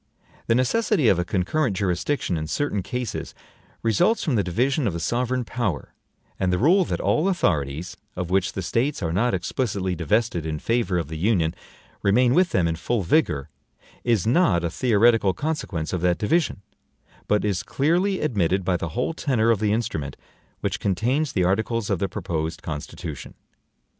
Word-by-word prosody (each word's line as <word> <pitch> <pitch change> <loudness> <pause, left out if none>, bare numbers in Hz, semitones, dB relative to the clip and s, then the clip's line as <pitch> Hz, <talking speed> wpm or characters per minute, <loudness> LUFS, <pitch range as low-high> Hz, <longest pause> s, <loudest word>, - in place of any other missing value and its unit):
The 115 - +3
necessity 150 - +2
of 90 - +3
a - - +1
concurrent 95 - 0
jurisdiction 95 +3 -1
in 80 -1 -3
certain 105 - -1
cases 120 +4 -4 0.5
results 115 - +2
from 155 - 0
the 105 -4 +2
division 125 - 0
of 100 - -1
the 85 - -3
sovereign 125 +6 0
power; 110 - -3 0.5
and 95 -1 +1
the 90 - +2
rule 175 - +4
that - - -2
all 160 +5 +1
authorities, 80 - -1 0.2
of 90 -1 -4
which 95 -1 +1
the 95 - -4
States 120 - -1
are 80 -1 -1
not 105 +3 +2
explicitly 95 0 -2
divested 105 -1 0
in 80 -1 -3
favor 115 0 0
of 85 -4 -2
the 80 +1 -6
Union, 85 -4 +2 0.5
remain 120 +5 +3
with 180 +3 +4
them 85 -3 +2
in 80 0 -1
full 100 +5 -1
vigor, 80 - +1 0.5
is 115 -7 +1
not 110 - +3
a 85 - -1
theoretical 115 -4 +3
consequence 145 - -3
of 90 - -1
that 90 -1 +2
division, 125 - 0 0.6
but 105 0 +2
is 100 -2 0
clearly 175 - +1
admitted 95 - +1
by 90 -1 +2
the 85 0 -4
whole 125 +6 0
tenor 120 -8 +1
of 110 - +1
the 105 -1 +1
instrument 80 - -2 0.4
which - - -2
contains 125 - 0
the 90 - +1
articles 110 +4 0
of 95 - +1
the 100 - -1
proposed 80 0 -3
Constitution. 75 -2 -6
105 Hz, 175 wpm, -24 LUFS, 90-125 Hz, 0.6 s, rule